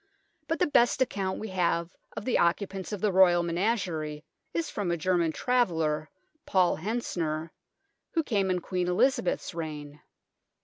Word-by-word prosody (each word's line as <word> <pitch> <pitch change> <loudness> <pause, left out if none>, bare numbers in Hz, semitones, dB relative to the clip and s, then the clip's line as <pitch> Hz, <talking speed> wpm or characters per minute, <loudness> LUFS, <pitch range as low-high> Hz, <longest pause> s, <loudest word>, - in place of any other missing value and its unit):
But 325 - 0
the 360 - +3
best 245 -6 +3
account 195 -5 -3
we 220 - -5
have 175 -2 0 0.2
of - - -4
the 255 - +2
occupants 190 +3 0
of 205 -3 -4
the 210 - +2
Royal 180 -2 +5
menagerie 170 -5 -1 0.3
is 165 -1 -1
from 200 -4 -3
a 170 - 0
German 170 -1 +1
travel 245 -3 +1
ler, 155 -1 -1 0.4
Paul 185 -2 +3
Hentzner, 165 -5 -2 0.6
who 325 - +2
came 200 -8 0
in 180 -1 0
Queen 180 -1 -2
Eliza 240 +8 +3
beth's 180 - -2
reign. 150 -3 -6
180 Hz, 160 wpm, -28 LUFS, 165-205 Hz, 0.6 s, Royal